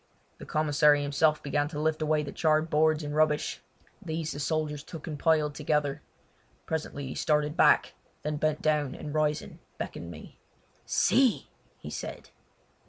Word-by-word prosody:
The - - -10
commissary 150 -1 +3
himself 150 +2 +2
began 145 +1 0
to 150 -1 -6
lift 155 +1 0
away 155 0 +1
the 140 - -6
charred 155 0 +1
boards 155 +1 +3
and 145 0 -4
rubbish. 155 -1 +1 0.4
These 160 0 -3
the 145 - -6
soldiers 150 0 -1
took 160 0 -9
and 150 -3 -5
piled 155 -2 +2
together. 150 -1 -1 0.6
Presently 155 -3 -3
he - - -4
started 150 0 +1
back, - - +4 0.3
then 150 0 -2
bent 155 0 0
down 150 -3 +1
and 150 - -7
rising 150 -1 -1 0.2
beckoned 85 - -6
me. 80 -2 -11 0.5
"See!" 260 -3 +2 0.3
he - - -9
said. - - -7
150 Hz, 155 wpm, -28 LUFS, 145-155 Hz, 0.6 s, back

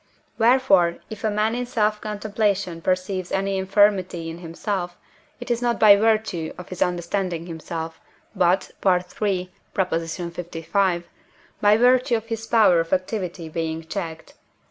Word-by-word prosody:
Wherefore, 220 -8 +4
if 220 - -8
a 220 - +2
man 215 +2 +1
in 245 0 -3
self 215 -3 0
contemplation 205 -4 -1
perceives 185 +1 -1
any 195 0 0
infirmity 190 -4 +2
in 165 - -9
himself, 175 +1 -4 0.4
it - - -5
is 235 0 0
not 240 -1 0
by 210 -2 +8
virtue 215 -6 0
of 180 - -10
his 185 - -7
understanding 175 -1 -1
himself, 165 -1 -6 0.4
but 180 0 +2
(III. 180 -2 +3 0.7
lv.) 175 +1 -1 0.6
by 210 +1 +5
virtue 250 0 +4
of 225 -1 -3
his 225 -1 -5
power 215 -7 +5
of 165 0 -2
activity 185 -3 -2
being 160 0 -3
checked. 165 -2 -6
190 Hz, 135 wpm, -23 LUFS, 170-215 Hz, 0.7 s, by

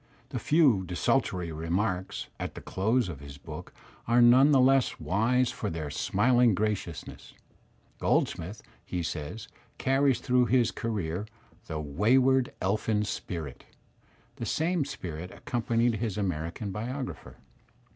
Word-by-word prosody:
The - - -3
''few 135 - +3
desultory 90 -1 0
remarks'' 90 +4 -2
at - - -5
the - - -7
close 110 +5 +1
of 80 -6 -6
his 70 0 -10
book - - -9 0.4
are 120 +1 +4
none 125 +4 +7
the 140 -3 +5
less 135 0 +3
wise 120 +6 +2
for 105 - -4
their 80 -4 -4
smiling 115 - +3
gradousness. 105 -5 -4 0.7
Goldsmith, 95 +6 0 0.2
he 90 -1 -3
says, 80 +7 -5 0.3
carries 135 -2 +2
throughout 125 -1 +2
his 125 -2 +3
career 100 -3 -3 0.4
''the 80 - -3
wayward 125 - +3
elfin 105 +2 +1
spirit.'' 80 -10 -5 0.7
The - - -4
same 165 -1 +1
spirit 90 - -6
accompanied 115 0 0
his 110 -3 -3
American 90 +1 -3
biographer. 125 +6 -5
110 Hz, 125 wpm, -28 LUFS, 90-125 Hz, 0.7 s, none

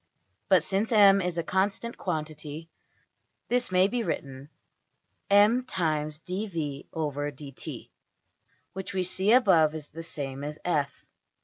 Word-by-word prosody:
But, - - +5
since 200 +4 -1
$m$ 200 -3 +7
is 180 -2 -2
a 170 - 0
constant 200 +6 -1
quantity, 155 -1 -5 0.8
this 245 -3 +1
may 185 +1 +5
be 240 +3 -1
written 135 -9 -4 0.8
$m 205 +5 +5
\dfrac{dv}{dt}$, 155 - -4 0.8
which 190 +1 -6
we 185 - +1
see 190 +3 0
above 175 -11 +5
is 155 -2 -6
the 165 - -8
same 140 -4 -6
as~$f$. 150 -2 -2
165 Hz, 110 wpm, -28 LUFS, 150-195 Hz, 0.8 s, $m$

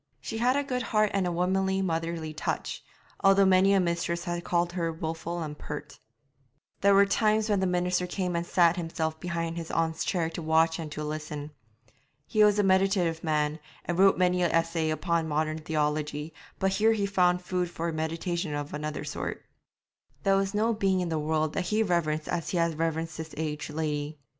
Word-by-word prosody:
She 225 - -5
had 250 +3 +3
a 285 - +1
good 255 -2 -2
heart 215 -4 +1
and 195 -2 +1
a - - -1
womanly, 190 +2 +1
motherly 165 -2 -2
touch, 155 - -3 0.4
although 195 0 +6
many 190 +1 +5
a 195 - +5
mistress 170 -1 -1
had 175 0 -3
called 175 0 0
her 170 -2 -1
wilful 165 +1 -4
and 150 -1 -6
pert. 150 -1 -8 0.8
There 200 0 +5
were 200 +1 +7
times 215 +1 +2
when 205 -2 +2
the 190 - +1
minister 180 0 0
came 180 -1 -2
and 170 - 0
sat 175 0 +3
himself 160 -2 -3
behind 170 -1 -3
his 165 -1 -5
aunt's 160 -1 0
chair 170 -4 0
to 170 - -5
watch 160 +1 +2
and 155 -2 -5
to 150 - -4
listen. 150 -1 -5 0.7
He 215 -1 +3
was 210 -1 +5
a 205 - +3
meditative 190 -3 +2
man, 150 -1 0 0.3
and 175 +1 -2
wrote 195 0 +6
many 180 0 +2
an 175 - +3
essay 165 -1 +1
upon 165 +1 0
modern 155 +1 -1
theology, 150 0 -2 0.2
but 190 0 +1
here 215 +4 +3
he 205 -2 0
found 180 -2 +2
food 180 -1 -1
for 170 -1 -3
meditation 165 0 -2
of 145 0 -5
another 150 0 -4
sort. - - -5 0.8
There 195 0 +4
was 195 +1 0
no 225 +2 +2
being 195 -3 +1
in 175 - -2
the 160 -1 -1
world 155 0 0
that 185 - -1
he 215 +4 +2
reverenced 155 -5 0
as 170 -3 -2
he 180 - -1
had 170 -2 0
reverenced 165 0 -1
this 160 -1 -7
aged 150 -1 -3
lady. 150 -1 -3
170 Hz, 195 wpm, -28 LUFS, 160-190 Hz, 0.8 s, were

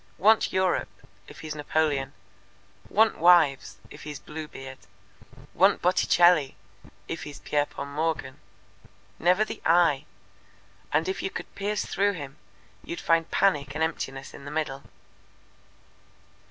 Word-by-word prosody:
'Want 215 +5 +4
Europe,' 185 -1 -1 0.2
if - - -12
he's 155 -1 -5
Napoleon; 145 -2 -1 0.8
'want 220 +1 +3
wives,' 165 -5 +4
if - - -11
he's 150 -1 -7
Bluebeard; 140 -4 -9 0.7
'want 195 +2 +4
Botticelli,' 175 -4 +3 0.5
if 165 - -5
he's 145 -1 -8
Pierpont 145 -1 -2
Morgan. 155 -3 -2 0.8
Never 180 +5 +3
the - - -8
'I'; 165 -5 +3 0.9
and 155 +2 +1
if 190 - -2
you - - -2
could - - -8
pierce 205 +1 -2
through 200 +1 +1
him, 145 -6 -8 0.5
you'd 170 - -6
find 165 0 +1
panic 145 -8 +1
and 160 - 0
emptiness 135 -4 -4
in - - -11
the - - -6
middle." 150 -3 -3
160 Hz, 125 wpm, -26 LUFS, 145-180 Hz, 0.9 s, Want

